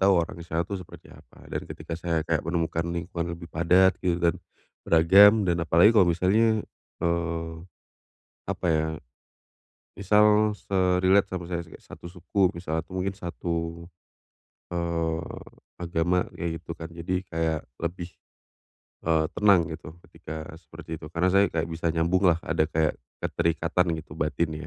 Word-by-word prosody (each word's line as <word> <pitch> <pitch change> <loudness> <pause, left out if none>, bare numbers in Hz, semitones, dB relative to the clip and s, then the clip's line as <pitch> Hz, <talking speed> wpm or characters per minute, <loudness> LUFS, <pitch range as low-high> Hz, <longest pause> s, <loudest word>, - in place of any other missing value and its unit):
tahu 95 +1 +5
orang 85 -1 0
misalnya 85 0 -2
itu 100 0 -5
seperti 90 - -13
apa. - - -18
Dan - - -4
ketika 80 +2 -8
saya 80 -2 -1
kayak 80 -2 0
menemukan 85 +1 -1
lingkungan 85 0 -4
lebih 85 -1 -12
padat 90 +3 +4
gitu 90 -2 +1
dan 85 -1 0 0.4
beragam 100 +6 +6
dan 85 -2 +1
apalagi 85 +6 +5
kalau 100 -6 +5
misalnya, 105 +6 +2 0.4
eee, 85 -1 -1 0.9
apa - - -4
ya 80 -1 +2 1.1
misal 105 +2 +4
se-relate 95 0 +2
sama 90 -2 -4
saya 85 -1 -3
kayak 80 - -14
s - - -26
satu - - -12
suku 95 +1 0
misalnya 80 -3 -3
tuh 90 - -16
mungkin 95 +1 -2
satu, 85 -2 -4 0.9
eee, 85 -1 -2 0.3
agama 85 +1 0
kayak 85 -1 -3
gitu 85 - -8
kan. 80 0 -8
Jadi 85 +2 -3
kayak 80 -2 -1 0.2
lebih, 85 +1 -4 0.9
eee, 80 -1 +2
tenang 100 -5 +5
gitu 80 +1 -10
ketika 80 0 -8
seperti 80 -1 -9
itu. 75 - -9
Karena 85 +2 +1
saya 100 +1 +5
nggak 80 -1 -1
bisa 85 0 -2
nyambung 85 +3 +2
lah 85 -1 +3
ada 80 0 0
kayak 80 -1 +1 0.2
keterikatan 85 +1 0
gitu 75 -1 -11
batin 80 +1 -1
85 Hz, 150 wpm, -26 LUFS, 80-90 Hz, 1.1 s, beragam